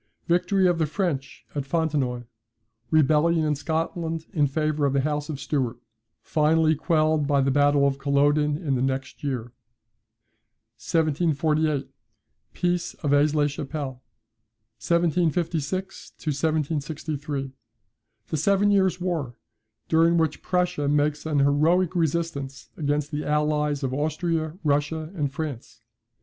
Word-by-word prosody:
Victory 180 +3 +2
of 175 -2 +1
the 160 - +2
French 150 -5 -3
at 145 - -2
Fontenoy. 140 -5 -1 0.7
Rebellion 155 +1 +3
in 150 - +2
Scotland 160 +2 -2
in 150 -5 +3
favour 150 0 0
of 135 - -1
the 140 - +2
House 150 +1 -2
of 145 -3 -4
Stuart: 130 -4 -1 0.5
finally 160 +1 +3
quelled 155 -1 +1
by 140 -1 +3
the 135 0 +2
battle 145 0 +4
of 140 0 0
Culloden 145 +1 +2
in 155 -5 -2
the 125 - 0
next 130 -1 -3
year. 125 -4 -3 1.3
1748. 155 -2 +1 0.7
Peace 175 0 -1
of 145 -2 -1
Aix 145 +1 +3
la 150 -1 +3
Chapelle. 140 -2 -4 0.8
1756 170 +1 -1
1763. 150 -2 -2 0.8
The 155 - -1
Seven 200 +6 +3
Years' 190 -3 +2
War, 165 -9 -2 0.5
during 165 +1 +4
which 160 -2 0
Prussia 180 -5 0
makes 150 +1 +1
an 150 -2 0
heroic 155 +6 +3
resistance 155 -6 -2
against 145 0 -1
the 150 0 -3
allies 150 -1 0
of 130 -1 -1
Austria, 155 +2 -1
Russia, 155 +2 0
and 145 -7 -2
France. 145 -8 -6
150 Hz, 125 wpm, -25 LUFS, 140-165 Hz, 1.3 s, battle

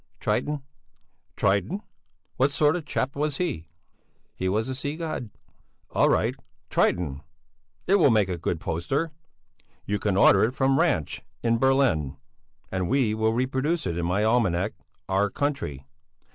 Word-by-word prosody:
"Triton." 150 -2 -1 0.7
"Triton? 100 - +1 0.5
What 135 +2 +4
sort 150 +2 +2
of 180 - -2
a - - -21
chap 135 -2 -2
was 150 0 -1
he?" 145 - -2 0.7
"He 95 - -2
was 110 +5 0
a 130 - -2
sea 145 +3 -3
god." 155 -8 -4 0.6
"All - - +3
right, - - +2 0.4
Triton. 75 -6 +1 0.6
It 195 +2 +4
will 150 - +6
make 110 -5 +3
a 90 -2 -3
good 85 0 -2
poster! 135 - -2 0.7
You 105 0 -1
can 100 -3 0
order 100 0 +6
it 120 +4 0
from 135 0 +2
Ranch 80 -3 +1 0.2
in 115 -1 +2
Berlin, 130 - +2 0.5
and 95 -2 -1
we 130 -4 +2
will 110 0 +1
reproduce 130 +7 0
it 85 - -1
in 85 0 -1
my 95 +4 +1
almanac 105 -4 +2 0.3
'Our 100 +1 +2
Country.' 90 - -3
115 Hz, 150 wpm, -26 LUFS, 95-140 Hz, 0.7 s, will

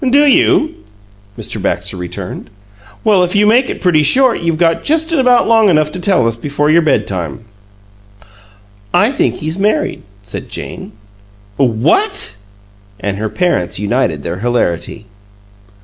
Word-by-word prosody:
"Do 285 +3 +4
you?" 295 +2 +2 0.6
Mr. - - -4
Baxter - - -2
returned. 90 -1 -7 0.5
"Well, 200 -4 +3
if 180 +2 -2
you 205 +1 +4
make 240 +5 +3
it - - -6
pretty 175 -4 +3
short, 255 - +3
you've 165 -1 -1
got 165 0 +1
just 320 +2 +1
about 250 -5 +3
long 225 -2 +4
enough 155 -3 +2
to 180 - -5
tell 180 - +2
us 115 -1 0
before 145 +4 -1
your 170 +2 +5
bedtime." 95 - -2 1.5
"I 210 +7 +3
think 280 - 0
he's 160 +4 -5
married," 210 +2 0 0.2
said 105 - -8
Jane. - - -7 0.6
"What!" 135 - +2 0.6
And 100 -1 -3
her 110 +1 -3
parents 170 - -1
united 100 - -1
their 85 +2 -5
hilarity. 110 -3 -2
165 Hz, 140 wpm, -14 LUFS, -, 1.5 s, your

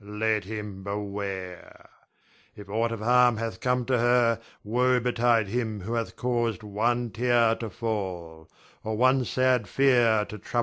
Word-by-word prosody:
Let 105 0 -1
him 105 -2 -6
beware. 100 -2 -6 0.7
If 105 -2 -11
aught 115 +2 0
of 115 -2 -5
harm 125 0 +4
hath 115 0 -4
come 125 -1 0
to 130 -1 +1
her, 120 -1 +3 0.2
woe 125 +4 +2
betide 120 -3 +1
him 110 -2 -2
who 110 +6 -5
hath 115 -1 -3
caused 120 -3 -1
one 115 +3 -1
tear 120 0 +2
to 115 - -5
fall, 90 -7 -5 0.3
or 110 0 -3
one 130 +2 +3
sad 130 -4 +1
fear 120 -4 +3
to 105 - -9
trouble - - -14
her. 120 - +2
115 Hz, 160 wpm, -26 LUFS, 105-120 Hz, 0.7 s, harm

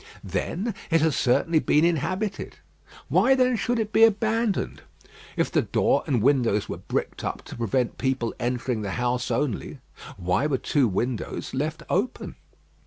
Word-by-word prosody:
Then 205 +6 -2 0.2
it 165 -2 +3
has 160 -2 +2
certainly 155 +6 +2
been 150 +1 +3
inhabited: 185 +5 -1 0.5
why 265 - +4
then 255 -1 +3
should 240 +2 0
it 220 -2 -2
be 225 - +6
abandoned? 220 -1 +1 0.6
If - - +1
the - - +3
door - - +1
and 120 -6 +1
windows 120 -6 +2
were - - -5
bricked - - -3
up - - -4
to - - -9
prevent 120 +2 -1
people 130 -3 -1
entering 120 -1 -1
the 100 -2 -3
house 125 0 -1
only, 125 -1 -2 0.4
why 90 +10 +1
were 140 -3 0
two 135 0 +1
windows 115 +4 -3
left 150 +4 -2
open? 205 +8 -1
145 Hz, 155 wpm, -25 LUFS, 120-195 Hz, 0.6 s, be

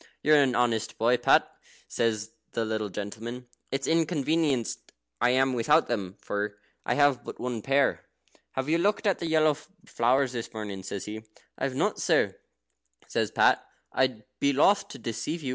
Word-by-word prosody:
"You're 150 -1 +6
an 130 -3 +2
honest 115 -2 0
boy, 120 +3 +3
Pat," 120 - +4 0.4
says 110 -2 -1 0.2
the 115 - 0
little 110 -1 -2
gentleman. 110 +6 -6 0.3
"It's 135 0 -1
inconvenienced 155 -5 0 0.3
I - - +4
am 130 +1 +3
without 150 +7 +3
them, 100 -6 -3
for. 105 0 -3 0.3
I - - +2
have 145 -4 +3
but - - -7
the - - -9
one 125 -3 -2
pair. 135 +3 +1 0.5
Have 130 +1 -2
you 165 +2 +2
looked 205 +4 +1
at 200 -3 +2
the 170 - -3
yellow 155 -1 +4 0.3
flowers 130 +3 +2
this 120 -2 -5
morning?" 105 -3 -5
he - - -10
says. 95 +1 -5 0.5
"I - - -2
have 135 -2 -3
not, - - 0
sir," - - +2 0.7
says - - 0
Pat; - - +3 0.3
"I'd 130 -5 +1 0.2
be 140 0 +2
loth 195 +9 +4
to - - -9
deceive 120 +8 -4
you. 130 - -3
125 Hz, 175 wpm, -27 LUFS, 110-145 Hz, 0.7 s, You're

